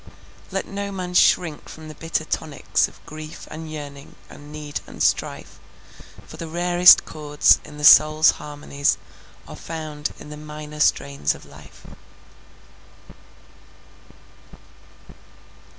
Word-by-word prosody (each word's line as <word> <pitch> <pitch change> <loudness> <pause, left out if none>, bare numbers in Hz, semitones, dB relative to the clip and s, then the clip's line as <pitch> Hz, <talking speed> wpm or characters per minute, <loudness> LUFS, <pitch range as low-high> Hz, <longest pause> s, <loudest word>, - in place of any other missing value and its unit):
Let - - -3
no 200 0 -5
man 180 -2 -5
shrink 170 -3 +2
from 160 0 -11
the 155 - -9
bitter 160 +1 -3
tonics 155 -2 -1
Of - - -20
grief, 155 0 -10
and 160 0 -8
yearning, 145 -2 -9 0.2
and 145 +1 -13
need, 150 -1 -6
and - - -4
strife, - - -1 0.7
For - - -12
the 165 - -6
rarest 175 +2 +6
chords 150 -1 +3
in 150 - -12
the 150 - -8
soul's 155 +1 +7
harmonies, 145 -1 -1 0.5
Are - - -9
found 155 -2 -6
in 150 - -12
the 150 - -8
minor 150 0 -9
strains 70 - +1
of - - -14
life. - - -16
155 Hz, 120 wpm, -22 LUFS, 150-160 Hz, 0.7 s, soul's